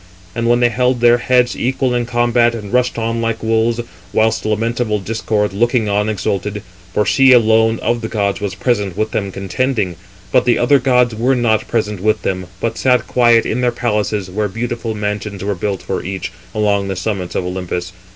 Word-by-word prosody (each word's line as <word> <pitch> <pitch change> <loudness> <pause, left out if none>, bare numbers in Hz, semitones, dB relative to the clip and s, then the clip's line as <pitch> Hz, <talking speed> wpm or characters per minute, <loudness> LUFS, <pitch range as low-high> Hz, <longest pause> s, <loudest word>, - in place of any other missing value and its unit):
And 115 +2 -1
they 120 - +5
held 125 0 +1
their 120 0 +5
heads 125 0 +2
equal 130 0 0
in 120 -1 -1
combat, 120 0 +2
and 105 -1 -7
rushed 125 -1 +1
on 115 0 -1
like 115 -1 -2
wolves; 115 +1 +1 0.3
whilst 110 0 +1
lamentable 110 0 0
Discord, 105 0 -1
looking 115 +1 +1
on, 105 +1 +1
exulted: 105 0 -2 0.3
for 105 - +1
she 135 +6 +5
alone 110 -1 +4
of 120 0 0
the 110 - -3
gods 100 -2 -1
was 100 -2 -3
present 100 -4 -1
with 110 - -1
them 100 -2 -2
contending. 100 -1 -2 0.3
But - - +3
the 120 - +3
other 140 +3 +4
gods 125 -2 +2
were 120 +5 +1
not 115 -3 +1
present 105 -3 -1
with 110 +3 0
them, 90 -1 -2
but 115 +3 -2
sat 125 -1 +2
quiet 120 -2 +3
in 125 - -1
their 125 -1 +2
palaces, 105 -4 -1
where 105 +3 -2
beautiful 115 +2 -4
mansions 105 -1 -4
were 100 +1 -1
built 95 +1 -3
for - - -3
each, 95 0 -5 0.2
along 100 -2 +1
the 95 - -3
summits 95 -1 -3
of 90 - -1
Olympus. 90 -1 -4
110 Hz, 190 wpm, -17 LUFS, 100-120 Hz, 0.3 s, they